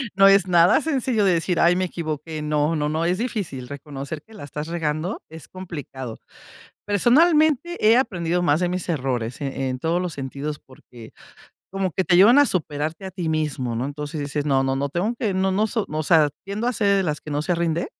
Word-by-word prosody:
no 195 0 +7
es 195 -1 +5
nada 175 - +5
sencillo 260 -7 0
de 195 - +4
decir: 170 +1 0
"Ay 175 +1 +4
me 185 - +1
equivoqué". 155 -2 -5
No 150 +1 0
no 150 -1 -1
no 160 +2 -1
es 180 +2 +1
difícil 185 - -4
reconocer 140 +1 -7
que 220 - -20
la 210 - -10
estás 150 +2 -6
regando, 165 +3 -2
es 160 0 -11
complicado. 145 -10 -8 0.7
Personalmente, 305 - +3
he 225 +3 +6
aprendido 175 -8 0
más 150 -1 +2
de 180 -1 0
mis 180 0 -3
errores 130 -5 -2
en 135 -1 -2
en 130 -1 -3
todos 165 +5 0
los 180 -3 -3
sentidos, 140 +2 -5
porque 120 -3 -15 0.6
como 195 -2 -2
que 190 - 0
te 175 -2 +3
llevan 230 +10 +7
a 290 - +5
superarte 155 - -2
a - - -6
ti 175 -3 -3
mismo, 150 -7 -1
¿no?, 120 - -2
entonces, 150 +2 -5
dices: 145 0 -3
"No 135 -2 +2
no 135 0 0
no 140 +1 -1
tengo 180 - -1
que 220 -4 -1
no 190 0 +1
no 200 +3 +1
no - - +3
so", 220 -1 -2
o 155 +1 -2
sea, 155 -1 +4 0.2
tiendo 200 +4 -3
a 245 - +1
ser 200 -3 +2
de 195 - +2
las 150 -3 -2
que 155 - -10
no 145 0 -1
se 175 +3 0
rinde. 170 0 -1
165 Hz, 220 wpm, -23 LUFS, 145-195 Hz, 0.7 s, no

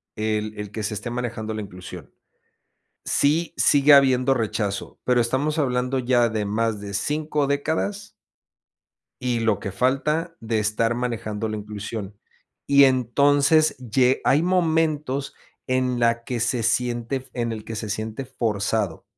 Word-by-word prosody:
el 110 0 -2
el 105 -1 -6
que 110 0 -5
se 105 +1 -2
esté 105 +3 -5
manejando 120 -2 -4
la 110 - -4
inclusión, 90 -2 -10 0.9
sí, 155 +4 +1
sigue 145 0 +5
habiendo 135 -1 +5
rechazo, 105 -4 -3
pero 125 -1 +3
estamos 140 +7 0
hablando 125 -1 0
ya 120 -2 +2
de 110 -1 -2
más 110 0 -1
de 100 -1 -7
5 150 +6 -1
décadas. 160 +8 -2 1.1
Y 125 -2 0
lo 110 -2 +1
que 100 - -5
falta 150 - 0
de 115 -1 -1
estar 110 +2 0
manejando 115 -3 -3
la 110 0 -3
inclusión. 105 -1 -6 0.5
Y 140 0 +7
entonces, 140 +5 +3
lle 125 +1 +1
hay 145 - +4
momentos 160 -6 0 0.3
en 130 -1 0
la 115 0 +2
que 125 -1 -3
se 120 0 0
siente 120 +2 0
f 130 - -12
en 120 -2 -2
el 110 -1 -6
que 115 - -6
se 110 -1 -5
siente 110 +5 -4
forzado. 110 -6 -2
120 Hz, 145 wpm, -23 LUFS, 110-140 Hz, 1.1 s, Y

